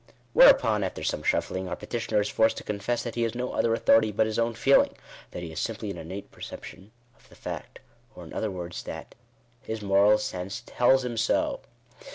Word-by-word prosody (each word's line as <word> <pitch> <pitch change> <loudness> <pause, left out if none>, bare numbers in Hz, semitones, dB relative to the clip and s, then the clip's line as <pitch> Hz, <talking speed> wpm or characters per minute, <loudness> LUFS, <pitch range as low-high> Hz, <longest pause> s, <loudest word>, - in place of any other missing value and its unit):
Whereupon, 110 - +6
after 95 - -4
some - - -1
shuffling, 95 0 -1
our - - -2
petitioner 115 -3 -1
is 105 - -1
forced 110 +1 +2
to - - -6
confess, 105 +3 -2
that 120 - -5
he 120 - -2
has 115 0 -1
no 125 +1 -3
other 115 - +1
authority 115 -1 +4
hut 110 +2 +2
his 110 +1 -2
own 115 0 0
feeling 135 +4 +3 0.2
— - - -18
that 90 - -7
he 85 - -6
has 80 - -5
simply 110 -2 -3
an 90 - -7
innate 95 +5 -8
perception 95 +3 -10 0.3
of - - -25
the - - -17
fact; - - -7 0.4
or, - - -10
in - - -11
other 110 - -2
words, 90 -2 -6
that - - -8 0.3
" 120 - -37
his 110 -1 -5
moral 100 +2 +5
sense 95 0 -5
tells 130 +1 +3
him 120 -2 -4
so." 115 - +1
110 Hz, 210 wpm, -27 LUFS, 100-115 Hz, 0.4 s, Whereupon